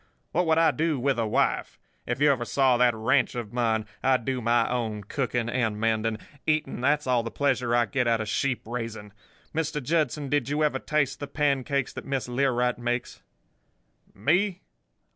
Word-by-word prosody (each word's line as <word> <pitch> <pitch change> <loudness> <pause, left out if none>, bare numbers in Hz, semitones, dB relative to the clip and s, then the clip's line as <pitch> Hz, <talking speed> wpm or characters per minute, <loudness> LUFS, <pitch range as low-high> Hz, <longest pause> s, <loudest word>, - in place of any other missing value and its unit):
What 180 +1 +1
would 160 0 +3
I 165 0 +5
do 160 -3 0
with 135 0 +1
a 115 - 0
wife? - - 0 0.3
If - - -2
you 145 0 +5
ever 130 -3 0
saw 130 +1 +3
that 120 -1 +4
ranch 125 +5 +1
of 120 -3 -5
mine! 110 -3 +1 0.2
I 130 -1 +4
do 125 +1 -3
my 115 0 +2
own 110 -4 -2
cooking 120 +1 -2
and 115 -4 -1
mending. 110 0 0 0.3
Eating—that's 150 -1 +1
all 125 -2 +2
the 115 - -5
pleasure 125 -1 0
I 120 -1 +4
get 125 +2 -1
out 115 -1 +2
of 110 - -3
sheep 125 +1 -1
raising. 110 -3 -6 0.4
Mr. 155 -1 -1
Judson, 150 0 0
did 140 -2 0
you 150 +2 +1
ever 145 -3 +1
taste 150 -2 0
the 145 - -5
pancakes 140 -2 0
that - - -7
Miss 135 -2 -2
Learight 125 -1 +1
makes?' 120 0 -3 0.9
"'Me? 180 - +1
125 Hz, 180 wpm, -26 LUFS, 115-145 Hz, 0.9 s, I